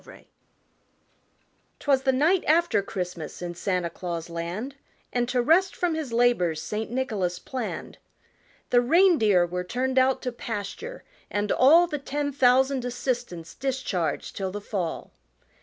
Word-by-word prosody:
FIELD - - -15 1.5
Twas 275 -2 +2
the 265 0 +2
night 320 +8 +2
after 320 -8 +3
Christmas 180 -4 -5
in 175 -1 -5
Santa 180 -1 -2
Claus 170 -2 -5
land 175 +11 -4 0.4
And 245 0 0
to 250 -1 +1
rest 370 +8 +3
from 350 -2 0
his 315 -5 -4
labors 230 -9 +2
St. 210 +8 -4
Nicholas 215 -8 -1
planned. 250 +4 -6 0.7
The 245 - +5
reindeer 245 - +4
were 180 +1 -3
turned 260 +7 0
out 260 0 +2
to 250 - -2
pasture 235 - -6 0.3
and 205 0 -1
all 320 +7 +6
The 305 -4 -4
ten 285 +1 -2
thousand 265 0 +3
assistants 245 -9 -3
discharged 255 -11 -2
till 190 -1 -2
the 205 - -5
fall. 190 -5 -4
245 Hz, 140 wpm, -26 LUFS, 180-270 Hz, 1.5 s, all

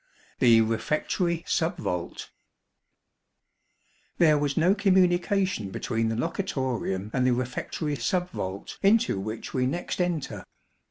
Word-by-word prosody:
The 115 -3 +6
Refectory 155 - -1
Sub 170 +2 0
vault. 90 - -4 1.9
There 155 -3 +5
was 145 -1 -1
no 175 +4 +4
communication 185 - +2
between 115 +3 -1
the 115 - -1
locutorium 120 - -2
and 130 - +1
the 125 -1 +3
refectory 130 +4 -3
sub 180 +4 -1
vault 95 - -6
into 210 - +3
which 110 +3 -6
we 125 -1 +1
next 175 +5 -2
enter. 175 -5 -2
145 Hz, 115 wpm, -26 LUFS, 115-180 Hz, 1.9 s, The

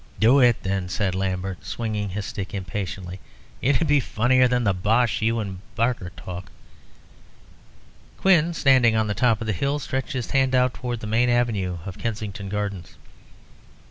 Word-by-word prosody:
"Do 120 +6 +5
it, 120 -3 +4
then," 95 -1 -2
said 95 0 -1
Lambert, 95 -1 -3
swinging 105 -3 -3
his 100 +2 -4
stick 100 0 -5
impatiently. 95 -1 -5 0.4
"It 135 +1 +3
would 160 - -1
be 145 0 +4
funnier 125 +1 +3
than 125 0 +1
the 100 -3 +2
bosh 110 +6 +1
you 115 +2 +1
and 95 -4 -5 0.2
Barker 115 -5 0
talk." 90 +3 -8 1.7
Quin, 170 -3 +3
standing 130 -6 +4
on 110 0 +2
the 105 - -1
top 115 -1 +2
of - - -3
the 110 - 0
hill, 140 +9 -1
stretched 135 +1 -3
his 125 -3 -4
hand 135 -1 +2
out 125 -1 +3
towards 120 -1 -4
the - - -6
main 115 +3 +2
avenue 110 -7 0
of 95 -3 -7
Kensington 105 -3 -4
Gardens. 100 -3 -4
110 Hz, 170 wpm, -24 LUFS, 95-125 Hz, 1.7 s, Do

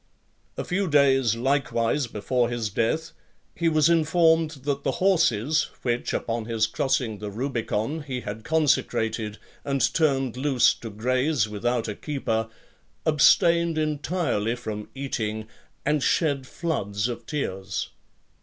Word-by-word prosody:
A - - -2
few 195 +2 -1
days 135 -6 +4
likewise 125 0 0
before 120 +3 0
his 115 -3 -2
death, 155 - 0 0.4
he 170 -1 +1
was 155 -1 +4
informed 165 0 +3
that 140 -1 -2
the 135 - 0
horses, 160 - +2
which, 120 -1 -1
upon 115 -1 -2
his 115 -1 +1
crossing 115 -3 -1
the 105 - -5
Rubicon, 120 +4 -2
he 130 -4 -4
had 110 0 -6
consecrated, 115 -8 0 0.3
and 140 -1 +1
turned 135 -6 +1
loose 135 -2 +3
to 115 - -8
graze 125 +4 +1
without 115 +3 -1
a 105 - -2
keeper, 115 -5 -2 0.6
abstained 170 +2 +4
entirely 150 - -1
from 110 -4 -6
eating, 110 -5 -3 0.4
and 150 0 +2
shed 140 -3 +1
floods 105 - -2
of 120 -1 -6
tears. 95 -10 -3
130 Hz, 125 wpm, -25 LUFS, 110-150 Hz, 0.6 s, days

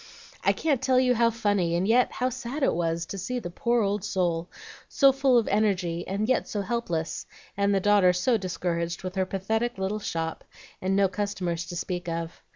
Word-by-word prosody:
I - - +5
can't 290 -6 0
tell 255 -1 +3
you 255 -1 +3
how 235 -1 +3
funny 205 -7 0
and 180 +3 0
yet 245 +3 +3
how 255 0 0
sad 260 +3 -5
it - - +3
was 165 0 -1
to 195 - -6
see 250 +7 -3
the 175 -8 -5
poor 235 +5 +1
old 200 0 -1
soul, 175 -4 -1 0.4
so 275 -1 +5
full 270 -2 +3
of 230 - +2
energy 185 -5 0
and 200 +3 -1
yet 255 - +1
so 205 - -2
helpless, 175 -8 -3 0.3
and 200 0 +2
the 195 - +3
daughter 200 -2 +5
so 180 +8 +1
discouraged 175 -3 -2
with 185 0 -4
her 190 -1 0
pathetic 220 +5 -1
little 190 +3 -2
shop 165 -5 -3 0.4
and 190 +1 0
no 200 0 +4
customers 185 -4 -3
to 175 - -6
speak 175 0 -3
of. 165 0 -4
195 Hz, 200 wpm, -27 LUFS, 175-235 Hz, 0.4 s, I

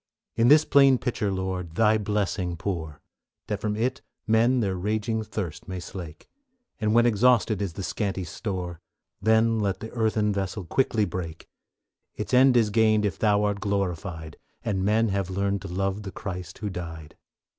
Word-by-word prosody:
In 115 +1 +3
this 150 +3 +7
plain 135 -2 +6
pitcher, 120 -5 -2
Lord, 95 -3 -3
Thy 110 -1 +4
blessing 100 -4 -1
pour, 80 -5 -4 0.5
That 105 -2 -3
from 105 -1 -1
it 125 +5 -1 0.2
men 115 +3 +3
their 100 -5 0
raging 110 +4 -1
thirst 90 -7 -5
may 95 -1 -4
slake, 85 -3 -9 0.5
And 110 0 +1
when 120 0 +6
exhausted 115 -2 +3
is 95 -5 -2
the 95 - -6
scanty 95 -1 -2
store, 90 -1 -5 0.4
Then 110 +1 +3
let 100 -2 -1
the 110 +1 -7
earthen 110 -2 +1
vessel 100 0 -3
quickly 110 +1 +1
break; 85 -3 -6 0.7
Its - - -5
end 130 0 +6
is 110 -3 +3
gained 110 -1 +3
if 95 -6 -2
Thou 105 -1 +3
art 105 -1 0
glorified, 90 -5 -3 0.3
And 95 -4 0
men 110 +3 +2
have 100 -2 -1
learned 100 +1 -1
to - - -7
love 95 +3 -2
the 100 -2 -7
Christ 90 -3 -6
who 105 -1 -4
died. 80 -4 -7
100 Hz, 165 wpm, -26 LUFS, 95-110 Hz, 0.7 s, this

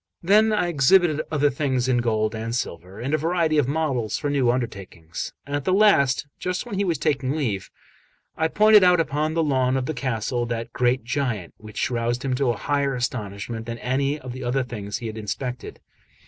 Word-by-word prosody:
Then 215 +5 +5
I 210 -4 +1
exhibited 160 +1 +4
other 145 -2 +2
things 130 -2 0
in 125 -2 +2
gold 110 -2 0
and 115 +1 -3
silver, 95 -3 -5
and 135 +5 -3
a 155 - +2
variety 165 -1 +1
of 135 - +1
models 140 -7 -1
for 145 -2 -2
new 135 -4 +2
undertakings. 100 -9 -4
At 145 0 -3
the 185 - 0
last, 170 -11 +4
just 185 +4 -2
when 240 - -8
he 200 +1 0
was 170 -5 0
taking 135 -2 0
leave, 110 -11 -2 0.7
I 160 - +1
pointed 210 +3 +6
out 180 -1 +5
upon 155 0 0
the 165 - +2
lawn 130 -3 +1
of 130 - -1
the 155 - -2
castle 120 -2 -2
that 115 0 -4
great 125 0 +1
giant, 120 -8 -2
which 110 +3 -4
roused 120 +2 -1
him 130 - 0
to 125 -1 +1
higher 140 +3 -1
astonishment 115 -2 -4
than 115 0 -4
any 135 +4 0
of 125 -3 -7
the 130 +1 -7
other 125 +2 0
things 105 -5 -5
he 120 - -8
had 110 0 -5
inspected. 125 +4 -5
130 Hz, 195 wpm, -24 LUFS, 120-155 Hz, 0.7 s, pointed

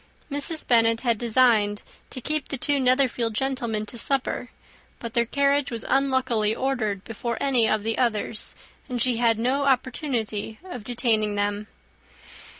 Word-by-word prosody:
Mrs. 290 +3 0
Bennet 230 -1 +3
had 235 -4 0
designed 225 -4 +3 0.3
to 255 - -7
keep 305 +2 -1
the 275 - -3
two 285 +2 +2
Netherfield 250 -3 +2
gentlemen 235 -5 -1
to 235 +2 -5
supper; 265 -2 -1 0.5
but 235 -1 -7
their 235 -1 +2
carriage 280 +1 +1
was, 230 -2 -5
unluckily, 260 -5 +1
ordered 220 -8 -2
before 230 +1 -4
any 250 -5 +2
of 215 -1 0
the 225 +1 -1
others, 225 -2 -1 0.3
and 250 -1 -3
she 245 0 +2
had 230 -2 +3
no 260 +5 0
opportunity 245 -5 -1
of 355 - -8
detaining 220 -3 0
them. 205 +1 -2
240 Hz, 150 wpm, -24 LUFS, 220-265 Hz, 0.5 s, Bennet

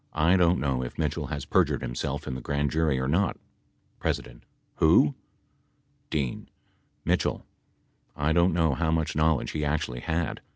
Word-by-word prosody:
I 80 +4 +4
don't 90 -1 +3
know 65 -3 0
if 60 - -6
Mitchell 75 -1 -1
has 75 -1 -4
perjured - - +2
himself - - -3
in 65 - -4
the 65 - -5
Grand 70 +1 -1
Jury 80 -4 +1
or 65 - -1
not. 90 +6 +1 0.7
P. - - +3 0.7
Who? 75 - +5 1.0
D. 70 -5 -2 0.6
Mitchell. - - 0 0.7
I 75 +2 +1
don't 85 +2 +4
know 80 -3 +2
how 80 +4 0
much 80 -1 0
knowledge 80 -1 +2
he 75 - -2
actually 70 -4 -1
had. 80 +4 -2
75 Hz, 155 wpm, -27 LUFS, 70-80 Hz, 1.0 s, Who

